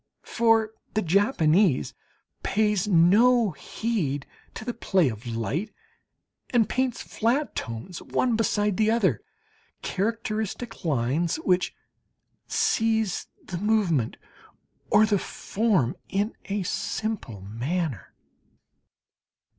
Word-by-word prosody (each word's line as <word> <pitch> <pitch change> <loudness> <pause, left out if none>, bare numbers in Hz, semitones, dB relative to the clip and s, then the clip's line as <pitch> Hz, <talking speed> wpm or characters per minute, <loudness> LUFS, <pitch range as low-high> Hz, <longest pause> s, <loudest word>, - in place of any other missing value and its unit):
For 225 -2 +3 0.2
the 215 - +2
Japanese 175 - +3 0.5
pays 210 -1 +1
no 210 +6 +5
heed 155 -6 -2 0.3
to 220 - -7
the 245 - -2
play 190 - +2
of 110 +1 -7
light, 120 - -2 0.8
and 235 -4 +3
paints 255 -2 -1
flat 245 +3 0
tones 115 +11 -5
one 245 -3 0
beside 210 -3 +1
the 215 0 +3
other 200 - +2 0.6
characteristic 220 +2 -3
lines, 150 +3 +1
which 185 - +1 0.7
seize 220 -4 +1 0.2
the 175 -2 -5
movement 190 - +1 0.7
or 210 +1 +6
the 210 -2 +2
form 195 - 0
in 205 +3 0
a 200 0 -2
simple 185 - -3
manner. 120 - -3
205 Hz, 100 wpm, -26 LUFS, 160-225 Hz, 0.8 s, or